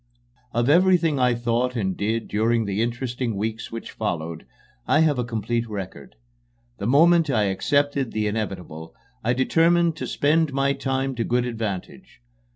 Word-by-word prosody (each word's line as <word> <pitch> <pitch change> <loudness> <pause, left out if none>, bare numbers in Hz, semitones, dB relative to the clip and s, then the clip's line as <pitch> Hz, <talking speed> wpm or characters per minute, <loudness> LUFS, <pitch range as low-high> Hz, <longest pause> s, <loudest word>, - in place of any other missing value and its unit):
Of 120 +1 0
everything 170 -2 +4
I 125 -1 +3
thought 120 +2 -1
and 95 -5 -1
did 110 +2 -2
during 115 +2 +1
the 100 +1 -1
interesting 120 0 -2
weeks 110 +3 -4
which 115 0 -7
followed, 85 -6 -4 0.4
I 155 - +4
have 150 -5 +2
a - - +1
complete 115 0 -2
record. 95 - -7 0.6
The 100 - -2
moment 165 +4 +5
I 115 -6 +2
accepted 140 +6 0
the 110 -1 -1
inevitable, 95 -7 -5 0.3
I 120 +2 +2
determined 165 +5 +3
to - - -4
spend 150 0 +1
my 135 0 +1
time 135 -1 -2
to 115 - 0
good 120 +1 0
advantage. 110 - -5
120 Hz, 155 wpm, -23 LUFS, 110-140 Hz, 0.6 s, moment